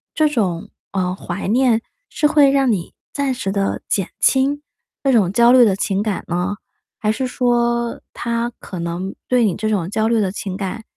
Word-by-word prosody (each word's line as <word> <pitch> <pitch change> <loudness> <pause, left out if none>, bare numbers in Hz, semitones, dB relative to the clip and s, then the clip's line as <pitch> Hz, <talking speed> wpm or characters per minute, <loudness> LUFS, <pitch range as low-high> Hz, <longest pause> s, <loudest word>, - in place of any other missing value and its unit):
这 310 -1 +4
种， 195 - -1 0.2
嗯， 185 -2 -1
怀 190 0 -5
念 235 -1 +3 0.3
是 305 - -1
会 295 -2 +5
让 270 -3 +3
你 180 -5 -3 0.2
暂 280 -2 0
时 220 -6 -3
地 195 0 -1
减 195 -3 0
轻 275 +2 +2 0.4
这 275 - +3
种 195 -6 +3
焦 235 +3 +5
虑 255 -1 +7
的 200 -4 +2
情 195 0 -1
感 210 -3 -2
呢， 180 +4 -1 0.4
还 215 - +1
是 255 +4 -2
说 240 -1 0
它 235 0 -2
可 185 - -8
能 170 +3 -4
对 250 -1 +3
你 190 - +1
这 215 +1 -2
种 185 -5 -1
焦 220 +2 0
虑 230 -1 +2
的 190 -2 0
情 190 -2 -5
感 205 +3 -4
220 Hz, 200 characters per minute, -19 LUFS, 195-250 Hz, 0.4 s, 虑